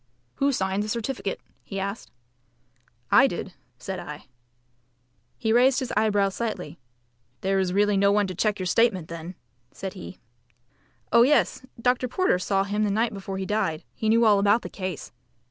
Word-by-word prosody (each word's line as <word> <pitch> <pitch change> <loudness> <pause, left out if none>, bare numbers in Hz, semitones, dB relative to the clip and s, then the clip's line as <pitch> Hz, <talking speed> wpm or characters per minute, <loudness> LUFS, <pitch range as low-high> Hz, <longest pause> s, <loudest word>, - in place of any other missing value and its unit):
"Who 280 +1 +2
signed 190 -4 -1
the 210 - -4
certificate?" 215 -3 -3 0.2
he 195 - -5
asked. 200 +3 -5 1.0
"I 275 - +7
did," 185 -3 -5 0.2
said 185 +9 -5
I. 150 -3 -8 1.1
He 220 -2 0
raised 255 +2 +5
his 260 - -4
eyebrows 205 -2 +2
slightly. 180 -9 -4 0.6
"There 195 0 +1
is 185 -1 0
really 205 +1 +2
no 200 +1 +4
one 205 0 +3
to 185 - -5
check 210 +3 0
your 185 - -4
statement 185 -3 +2
then?" 170 +2 -7 0.4
said 190 -1 -6
he. 85 +1 -9 0.9
"Oh 235 - +6
yes, 270 +1 +3 0.2
Dr. 250 +1 +1
Porter 250 - +1
saw 195 +1 +1
him 205 +2 -1
the 210 - +1
night 220 +3 0
before 195 -1 -6
he 190 - -3
died. 185 -7 -1
He 220 - -2
knew 230 +1 +4
all 205 -2 +5
about 205 +3 +3
the - - -6
case." 185 -5 -6
200 Hz, 170 wpm, -25 LUFS, 190-230 Hz, 1.1 s, I